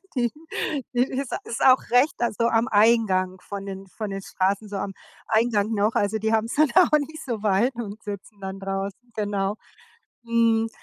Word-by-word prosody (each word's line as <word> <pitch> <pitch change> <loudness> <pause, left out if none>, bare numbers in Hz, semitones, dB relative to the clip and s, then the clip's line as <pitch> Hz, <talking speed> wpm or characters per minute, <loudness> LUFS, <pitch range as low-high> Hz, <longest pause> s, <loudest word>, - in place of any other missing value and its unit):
Die 240 -3 +1 0.6
die 245 0 +3
ist 265 0 -4
ist 230 - -5
auch 260 0 +7
recht 250 +5 +4
also, 235 -1 +1
am 230 +1 +2
Eingang 205 -4 +3
von 200 -1 -7
den, 195 0 -7
von 215 +2 -6
den 195 0 -4
Straßen, 195 +3 -1
so 205 - -6
am 195 0 -4 0.3
Eingang 220 -1 +2
noch. 210 +2 +1
Also, 205 +2 +1
die 220 +1 0
haben's 225 +1 0
dann 300 -1 +4
auch 355 -4 +6
nicht 310 +2 -6
so 230 -5 -4
weit 215 +6 +2
und 220 -2 -6
sitzen 205 0 -8
dann 190 0 -5
draußen, 195 +5 -5
genau. 205 -1 -1 0.7
Mhm, 230 -1 +2
220 Hz, 175 wpm, -24 LUFS, 200-235 Hz, 0.7 s, auch